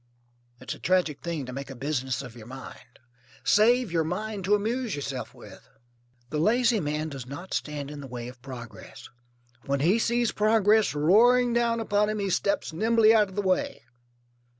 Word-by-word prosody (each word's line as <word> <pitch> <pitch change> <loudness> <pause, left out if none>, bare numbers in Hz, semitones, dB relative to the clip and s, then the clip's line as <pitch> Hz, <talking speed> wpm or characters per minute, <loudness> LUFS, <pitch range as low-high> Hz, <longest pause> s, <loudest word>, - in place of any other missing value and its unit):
It's - - -5
a - - -12
tragic 180 -5 +1
thing 165 -5 -4
to 125 - -8
make 140 +1 -6
a 135 - -8
business 130 -1 -2
of 125 -2 -10
your 115 -2 -12
mind. 130 -1 -11 0.5
Save 235 0 +4
your 165 -1 +1
mind 200 +5 -4
to 205 +2 +4
amuse 225 +2 -2
yourself 140 -3 -5
with. - - -14 0.6
The 150 - -1
lazy 230 +5 +3
man 150 0 -2
does 135 -4 -8
not 170 +8 -8
stand 145 -1 -3
in 145 -1 -8
the 135 - -8
way 120 -1 -6
of 125 0 -12
progress. 125 -4 -10 0.6
When 140 0 0
he 185 +9 +3
sees 235 0 +1
progress 215 -3 +3
roaring 235 +10 +4
down 235 -1 +1
upon 210 -1 +1
him 215 - -2
he 200 -2 -1
steps 200 -2 0
nimbly 225 +4 +4
out 210 -3 +4
of 190 - -13
the 205 - -1
way. 185 -10 -1
185 Hz, 180 wpm, -27 LUFS, 140-220 Hz, 0.6 s, Save